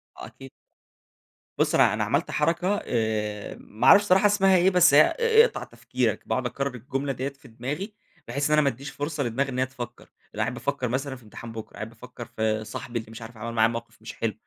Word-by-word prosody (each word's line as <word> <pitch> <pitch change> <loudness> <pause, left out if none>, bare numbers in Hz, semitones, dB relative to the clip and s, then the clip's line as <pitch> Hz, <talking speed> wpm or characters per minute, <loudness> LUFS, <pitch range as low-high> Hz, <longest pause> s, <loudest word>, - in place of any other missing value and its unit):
آه، - - -8
أكيد. - - -13 1.1
بُص، - - +2
أنا - - +5
أنا - - 0
عملت - - 0
حركة 180 +5 +1
آآ، 105 -3 -2
ما 110 - -2
أعرفش 205 - +8
الصراحة 195 0 +4
اسمها 195 -2 +5
إيه، 180 +2 +4
بس 180 -4 +5
هي 145 - +9 0.2
ا 460 -1 +6
اقطع - - -4
تفكيرك، - - -2
باقعد - - -1
أكرر 140 -1 -3
الجملة 135 +3 -3
ديّة 130 +2 -3
في 140 -1 -18
دماغي 145 - -5 0.3
بحيث 140 0 -2
إن - - +2
أنا 150 - +5
ما 140 - +3
اديش 135 +3 -7
فرصة 145 0 -3
لدماغي 130 +4 -1
إن 130 - -3
هي 130 - +3
تفكر. 120 -2 -8 0.3
بابقى - - -8
قاعد - - 0
بافكر 125 - -2
مثلًا 135 +3 -2
في 125 - -15
امتحان 115 +2 -10
بكره، 110 -1 -8
قاعد 105 +1 -6
بافكر 120 +1 -10
في 110 -1 -1
صاحبي 115 +2 -5
اللي 110 0 -11
مش 115 - -10
عارف 115 0 -10
عمل 115 +2 -5
معايا 110 -1 +4
موقف 115 -1 -7
مش 110 - -8
حلو، 115 -2 -2
125 Hz, 220 wpm, -26 LUFS, 115-150 Hz, 1.1 s, هي